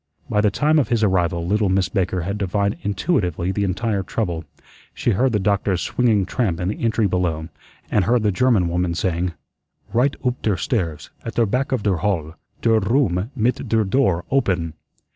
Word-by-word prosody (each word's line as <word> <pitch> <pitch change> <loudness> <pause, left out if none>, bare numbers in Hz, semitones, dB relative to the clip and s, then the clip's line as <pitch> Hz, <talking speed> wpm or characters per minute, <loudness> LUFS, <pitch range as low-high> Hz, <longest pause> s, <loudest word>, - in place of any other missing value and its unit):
By 105 - +1
the 105 - +3
time 150 +9 +2
of 140 - +1
his 115 -2 +1
arrival 85 -4 +1
little 105 +2 +1
Miss 95 0 +2
Baker 95 -1 -1
had 100 +5 -3
divined 100 +1 0
intuitively 95 - 0
the 100 +1 -1
entire 100 +2 -1
trouble. 90 -4 -3 0.5
She 120 - 0
heard 125 +6 +2
the 105 - +2
doctor's 100 -2 +1
swinging 110 -6 +2
tramp 95 -5 -1
in 90 0 -1
the 105 - -4
entry 115 -1 +2
below, 90 -4 -1 0.4
and 100 - +3
heard 120 +2 +2
the 105 - +3
German 110 -4 +2
woman 85 0 -1
saying: 90 0 -1 0.6
"Righd 130 +4 +2
oop 125 0 0
der 105 -4 +1
stairs, 85 - -2
at 115 - -6
der 115 - +3
back 125 +6 -1
of 130 -6 0
der 100 -4 +2
halle. 80 -4 -1 0.3
Der 115 -1 +4
room 100 -3 +1
mit 125 +1 0
der 110 -1 +3
door 95 -5 +1
oppen." 95 - +1
100 Hz, 185 wpm, -21 LUFS, 90-115 Hz, 0.6 s, Der